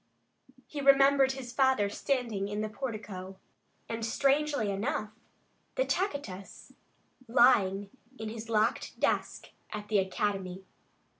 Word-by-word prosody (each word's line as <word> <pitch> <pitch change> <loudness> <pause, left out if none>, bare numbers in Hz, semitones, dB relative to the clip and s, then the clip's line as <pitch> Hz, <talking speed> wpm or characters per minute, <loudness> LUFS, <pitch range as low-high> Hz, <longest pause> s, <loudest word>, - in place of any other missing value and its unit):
He 290 - -6
remembered 275 -1 +5
his 260 -2 -7
father 265 -6 +3
standing 225 -3 -1
in 205 +1 -3
the 215 - -2
portico, 210 -6 -6 0.5
and, 230 0 -4
strangely 275 -1 +1
enough, 210 +1 -2 0.6
the - - +1
Tacitus 285 - -4 0.5
lying 205 -6 +4 0.3
in 220 0 -5
his 225 +1 -7
locked 220 +2 0
desk - - 0 0.2
at 210 -1 -6
the 210 -2 +4
academy. 190 -1 -2
220 Hz, 115 wpm, -30 LUFS, 200-270 Hz, 0.6 s, remembered